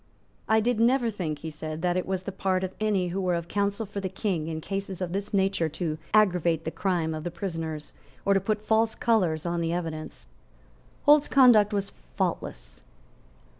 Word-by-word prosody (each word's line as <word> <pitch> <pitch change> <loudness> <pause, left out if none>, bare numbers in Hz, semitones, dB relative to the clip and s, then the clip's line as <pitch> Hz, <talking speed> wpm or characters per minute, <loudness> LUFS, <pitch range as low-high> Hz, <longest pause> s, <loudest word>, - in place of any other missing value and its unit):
"I 220 0 +5
did 240 0 +1
never 240 0 +3
think," 165 -7 -3
he 160 - -4
said, 155 +1 -6
"that 175 -1 +2
it 185 - -1
was 190 -1 -2
the 200 - -4
part 190 -1 0
of 190 0 -3
any 200 -4 +1
who 190 +3 -2
were 180 -2 +1
of 170 0 -4
counsel 200 +3 -1
for 200 0 -5
the 190 -1 -3
King 185 -4 -2
in 160 -1 -3
cases 195 +2 -4
of 180 -2 -3
this 200 +2 -3
nature 190 -4 +1
to 155 0 -3
aggravate 175 -6 +3
the 160 - -2
crime 175 -4 -1
of 155 -1 -5
the 175 - -2
prisoners, 165 -4 -5 0.3
or 200 - +4
to 195 - +4
put 210 +2 -2
false 220 0 +2
colours 180 -9 +1
on 170 0 -1
the 165 0 0
evidence." 160 - -5 0.8
Holt's 295 0 +6
conduct 240 -6 +6
was 200 -1 -2 0.3
faultless. - - -3
185 Hz, 195 wpm, -27 LUFS, 165-205 Hz, 0.8 s, Holt's